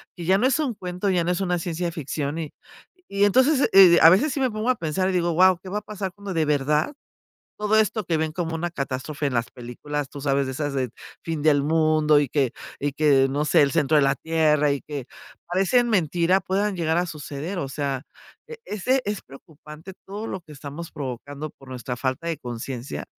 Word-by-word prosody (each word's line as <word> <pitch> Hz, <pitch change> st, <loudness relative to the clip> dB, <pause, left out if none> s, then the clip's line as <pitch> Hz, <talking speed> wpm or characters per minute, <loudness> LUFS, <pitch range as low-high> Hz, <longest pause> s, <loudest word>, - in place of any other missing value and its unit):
que 175 Hz, -, -7 dB
ya 190 Hz, +3 st, +4 dB
no 250 Hz, -, +3 dB
es 260 Hz, -, +2 dB
un 285 Hz, -6 st, 0 dB
cuento, 180 Hz, 0 st, -4 dB
ya 180 Hz, -2 st, +2 dB
no -, -, -1 dB
es 180 Hz, -, -1 dB
una 180 Hz, -2 st, 0 dB
ciencia 170 Hz, 0 st, -3 dB
ficción 150 Hz, -1 st, -4 dB
y 155 Hz, -3 st, -6 dB, 0.6 s
y 200 Hz, +1 st, +2 dB
entonces, 260 Hz, +7 st, +3 dB
eh, 185 Hz, -3 st, +8 dB
a 165 Hz, -, +10 dB
veces 235 Hz, -, +3 dB
sí 280 Hz, -, -3 dB
me 260 Hz, -1 st, +2 dB
pongo 215 Hz, +3 st, -2 dB
a -, -, 0 dB
pensar 180 Hz, 0 st, -1 dB
y -, -, -1 dB
digo: 175 Hz, -1 st, +1 dB
"¡Guau!, 185 Hz, +2 st, +5 dB
¿qué 190 Hz, -, -8 dB
va 205 Hz, +3 st, -2 dB
a -, -, -17 dB
pasar 200 Hz, -3 st, -5 dB
cuando 200 Hz, -1 st, -6 dB
de 160 Hz, -2 st, +1 dB
verdad, 150 Hz, -, +1 dB, 0.7 s
todo 210 Hz, +1 st, +2 dB
esto 215 Hz, 0 st, +1 dB
que 165 Hz, -2 st, 0 dB
ven 160 Hz, 0 st, -1 dB
como 165 Hz, -1 st, -3 dB
una 170 Hz, +1 st, -3 dB
catástrofe 140 Hz, 0 st, -3 dB
en 135 Hz, -, -3 dB
las 115 Hz, 0 st, -1 dB
películas?", 135 Hz, +4 st, -5 dB
tú 140 Hz, -, -9 dB
sabes 140 Hz, -1 st, +1 dB
de 130 Hz, -, -4 dB
esas 145 Hz, +1 st, -3 dB
de 130 Hz, -2 st, -1 dB, 0.3 s
fin 160 Hz, -3 st, -3 dB
del 150 Hz, -2 st, +4 dB
mundo, 155 Hz, -1 st, +3 dB
y 145 Hz, -3 st, -1 dB
que 135 Hz, -4 st, +1 dB, 0.3 s
y 145 Hz, 0 st, -2 dB
que 140 Hz, -2 st, +4 dB
no 145 Hz, +3 st, -1 dB
sé, 150 Hz, -, +4 dB
el 140 Hz, -, +1 dB
centro 155 Hz, -1 st, +2 dB
de -, -, +5 dB
la 135 Hz, 0 st, +2 dB
tierra, 155 Hz, -2 st, +2 dB
y 140 Hz, -, -2 dB
que 145 Hz, -4 st, -6 dB, 0.4 s
parecen 195 Hz, +7 st, +2 dB
mentira 180 Hz, -2 st, +2 dB
puedan 200 Hz, +2 st, -1 dB
llegar 165 Hz, -2 st, 0 dB
a 175 Hz, -, +1 dB
suceder, 155 Hz, +3 st, -5 dB
o 140 Hz, -, -4 dB
sea, 140 Hz, -2 st, -3 dB, 0.5 s
e 465 Hz, -, -8 dB
ese 255 Hz, +6 st, 0 dB
es 205 Hz, -1 st, -3 dB
preocupante 155 Hz, +5 st, -13 dB
todo 205 Hz, +3 st, -6 dB
lo 190 Hz, -, -5 dB
que 160 Hz, -, -16 dB
estamos 145 Hz, +4 st, -8 dB
provocando 140 Hz, +2 st, -6 dB
por 135 Hz, -, -18 dB
nuestra 125 Hz, -1 st, -5 dB
falta 130 Hz, +5 st, -2 dB
de 165 Hz, -3 st, -2 dB
consciencia. 120 Hz, 0 st, -6 dB
160 Hz, 220 wpm, -24 LUFS, 145-190 Hz, 0.7 s, a